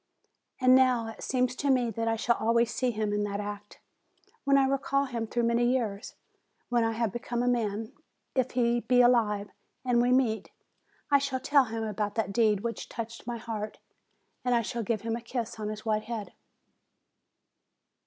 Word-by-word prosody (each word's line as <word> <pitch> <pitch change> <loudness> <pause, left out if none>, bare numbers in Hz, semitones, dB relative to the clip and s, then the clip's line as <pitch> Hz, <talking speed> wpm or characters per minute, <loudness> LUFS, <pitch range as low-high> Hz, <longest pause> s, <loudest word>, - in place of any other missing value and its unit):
And, 255 -1 +6
now, 255 -3 +4
it 225 - -10
seems 250 -1 0
to 285 - -1
me 250 -3 +3
that 230 +2 -2
I 225 - +2
shall 235 +1 +1
always 230 0 +2
see 255 - 0
him 215 -2 -1
in 205 0 0
that 200 0 -3
act, 205 0 -7 0.7
when 275 0 +5
I 270 - +4
recall 275 +1 +1
him 235 -4 -3
through 240 +2 -1
many 235 +1 +2
years; 240 -4 -1 0.5
when 240 -1 +2
I 225 0 +1
have 225 -2 -1
become 240 0 -2
a - - 0
man, 220 -3 -1 0.4
if 260 -1 +1
he 240 -1 +2
be 250 +1 +3
alive, 215 -4 +3 0.3
and 245 -1 +3
we 245 +1 +2
meet, 250 -4 +2 0.6
I 280 - +6
shall 275 -2 -2
tell 275 +1 +4
him 225 -1 -4
about 210 -1 -2
that 215 -3 -1
deed 215 -3 +3
which 230 +1 -4
touched 230 0 -7
my 240 -1 -3
heart; 220 -2 -5 0.7
and 250 -1 +2
I 235 - +2
shall 235 +2 -3
give 220 -1 -1
him 225 0 -2
a 235 - -5
kiss 235 -1 -4
on 210 -1 -3
his 215 +1 -7
white 215 -1 0
head. 225 -3 -5
235 Hz, 190 wpm, -29 LUFS, 220-250 Hz, 0.7 s, And